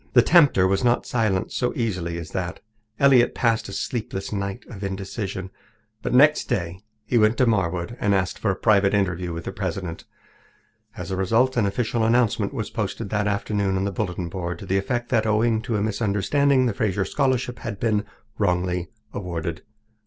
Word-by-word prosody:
The 120 - +7
tempter 145 - +5
was 95 +4 +1
not 120 0 +2
silenced 110 -6 0
so 125 - 0
easily 90 -8 -2
as 85 -2 -7
that. 95 -2 -3 0.4
Elliott 135 -3 +5
passed 115 -4 +1
a - - -7
sleepless 100 -2 -4
night 100 +3 -3
of 100 -4 -9
indecision. 95 0 -4 0.5
But - - -3
next 150 +4 +5
day 90 -7 -2 0.3
he 120 +2 +2
went 110 +2 +3
to 130 - +4
Marwood 95 -1 0
and 100 -1 +2
asked 90 -1 -1
for 105 - 0
a 95 - +1
private 100 -1 +3
interview 90 -3 0
with 85 0 -5
the - - -4
president. 90 -3 -4 0.9
As - - -6
a - - 0
result, 115 +8 +2
an 115 -4 +2
official 115 +2 -1
announcement 115 -3 +2
was 115 -7 -4
posted 105 0 -3
that 105 -1 0
afternoon 100 -1 0
on 95 - 0
the 100 - -1
bulletin 90 -3 -3
board 90 -1 -4
to 100 - -9
the 95 +1 +1
effect 120 +4 -2
that, 110 -3 +2
owing 110 +1 +2
to 115 - -2
a 100 - 0
misunderstanding, 115 +6 +2
the 120 - 0
Fraser 100 -2 0
Scholarship 130 -3 0
had 100 - -5
been 105 -2 +1 0.4
wrongly 90 -2 0 0.2
awarded. 85 -4 -4
100 Hz, 180 wpm, -24 LUFS, 95-115 Hz, 0.9 s, The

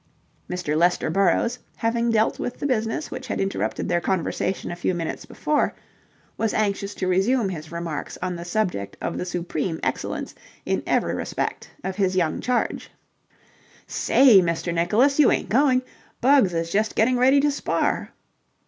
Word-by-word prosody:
Mr. 180 -4 -2
Lester 175 0 +2
Burrowes, 195 +7 +2 0.2
having 235 0 0
dealt 220 -1 +2
with 245 - -4
the - - -4
business 230 +1 -1
which - - -6
had - - -3
interrupted 195 0 -2
their 175 -1 +1
conversation 190 +1 -1
a - - -4
few 175 +1 -1
minutes 165 -2 -4
before, 300 -1 0 0.6
was 225 -1 0
anxious 200 -1 -1
to 185 - -2
resume 195 +4 +2
his 160 -3 -7
remarks 170 -2 -5
on 180 -1 -3
the 170 - -6
subject 175 - -2
of - - -3
the - - -2
supreme 175 -2 -3
excellence - - -3 0.3
in - - 0
every - - +1
respect - - -3
of 190 0 -4
his 190 -2 +1
young 170 -4 +1
charge. 250 -1 -1 1.0
"Say, 245 -8 +5
Mr. 170 0 -1
Nicholas, 220 - +2
you 290 - +6
ain't - - -1
going'? 255 +2 +3 0.4
Bugs 260 -6 +4
is 165 0 -2
just 215 +2 0
getting 245 +3 +3
ready 265 +3 +5
to 290 +1 +2
spar." 280 - -1
195 Hz, 160 wpm, -24 LUFS, 175-240 Hz, 1.0 s, you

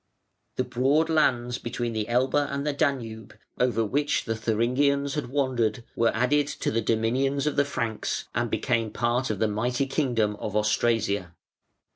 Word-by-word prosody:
The 130 - +1
broad 135 +6 +1
lands 125 -5 +2
between 120 0 -3
the 110 -1 -2
Elbe 125 +2 +1 0.2
and 140 +1 -3
the 150 - 0
Danube, 115 -7 -2 0.2
over 115 -3 +2
which 145 +7 0
the 115 - -1
Thuringians 125 +6 +1
had 150 -4 -2
wandered, 125 -5 0
were 115 0 +3
added 140 +5 +2
to - - -2
the 115 - +1
dominions 130 +6 +1
of 150 - 0
the 145 - +3
Franks 115 -6 -3
and 115 +1 0
became 115 -1 0
part 120 +4 0
of 110 - -1
the 110 - +1
mighty 120 +5 0
kingdom 120 -7 0
of 105 -1 -5
Austrasia. 105 -4 +1
120 Hz, 160 wpm, -26 LUFS, 110-140 Hz, 0.2 s, were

